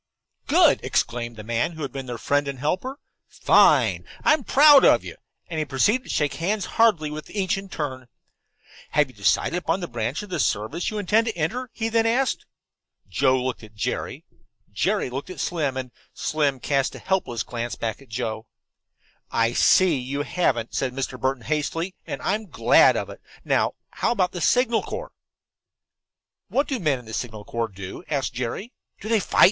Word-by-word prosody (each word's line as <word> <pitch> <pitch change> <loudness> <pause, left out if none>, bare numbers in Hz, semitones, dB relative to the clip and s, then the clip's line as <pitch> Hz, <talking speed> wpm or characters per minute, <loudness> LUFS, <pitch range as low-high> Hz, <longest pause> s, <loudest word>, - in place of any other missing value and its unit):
"Good!" - - +5
exclaimed 120 0 -1
the 110 - -9
man 115 +8 -1
who 160 -1 -6
had 140 - -4
been 135 -1 -6
their 120 -1 -4
friend 145 +4 0
and 140 -1 -4
helper. 185 - -2 0.3
"Fine! - - +4 0.2
I'm 305 -3 +4
proud 290 +2 +7
of - - +5
you," - - -8 0.3
and 160 -2 -4
he 155 - 0
proceeded 205 - +1
to - - -13
shake 150 -2 0
hands 200 +5 -1 0.2
heartily 170 -10 +4
with 155 0 -7
each 195 -3 0
in 195 0 -7
turn. 130 -7 -5 0.9
"Have 150 -2 +3
you - - -15
decided 105 - +1
upon 175 +1 -1
the 175 - -4
branch 120 - -3
of 205 - -11
the - - -2
service 110 +12 -1
you 215 - -5
intend 215 +3 +2
to 220 - -3
enter?" 240 +11 -2
he 225 - -2
then 225 0 +2
asked. 255 +4 0 0.6
Joe 130 -2 +2
looked 130 -1 -3
at 110 -1 -14
Jerry, 105 - -3 0.5
Jerry - - 0
looked 135 +3 -5
at 185 - -8
Slim, 145 -6 -1
and 130 -1 -5 0.2
Slim 145 -4 0
cast 135 +1 0
a - - -7
helpless 190 -12 -1
glance 120 0 -4
back 115 +2 -4
at 135 - -17
Joe. 110 -1 -4 0.8
"I 115 +1 +1
see 175 +2 +4
you 140 +3 -3
haven't," 130 -10 0
said 130 -2 -1
Mr. 130 -1 -4
Burton 130 -2 -1
hastily, 160 +5 -2
"and - - -5
I'm 210 +2 -1
glad - - +5
of - - -4
it. - - -12 0.2
Now - - +2 0.2
how - - 0
about 190 -6 +1
the 175 - -6
Signal 240 +3 +3
Corps?" - - -6 1.4
"What 280 +2 0
do 265 -4 -2
men 150 -6 +1
in 125 - -13
the 110 - -9
Signal 110 -3 -5
Corps 115 -1 -2
do?" 95 - -9
asked 135 -7 -1
Jerry. 125 - -4 0.3
"Do 215 - -8
they 225 -1 +3
fight?" - - -2
150 Hz, 185 wpm, -24 LUFS, 125-195 Hz, 1.4 s, proud